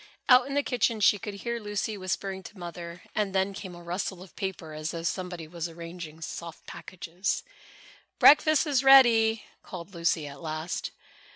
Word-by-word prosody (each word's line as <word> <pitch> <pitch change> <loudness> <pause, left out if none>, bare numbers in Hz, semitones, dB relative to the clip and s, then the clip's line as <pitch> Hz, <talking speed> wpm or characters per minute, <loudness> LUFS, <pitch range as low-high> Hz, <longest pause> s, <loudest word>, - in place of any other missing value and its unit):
Out 250 0 +7
in 275 - -4
the 285 - +2
kitchen 235 -3 0
she 205 0 +4
could 205 +2 -6
hear 235 +3 -3
Lucy 210 0 -3
whispering 190 0 -3
to 205 - -12
Mother 170 0 -8
and 205 -2 -1
then 190 +1 +1
came 190 -2 -8
a 175 - -12
rustle 180 +1 -4
of 185 - -17
paper 190 -5 -5
as 155 +1 -4
though 165 -1 -5
somebody 175 -1 -3
was 170 +1 -5
arranging 165 -1 -9
soft 170 0 -7
packages. 180 +1 -4 0.7
"Breakfast 310 +2 +6
is 275 -4 +1
ready," 230 -5 +6 0.2
called 180 +1 -9
Lucy 170 -2 0
at 140 -1 -9
last. 160 +1 -4
185 Hz, 170 wpm, -28 LUFS, 170-215 Hz, 0.7 s, Out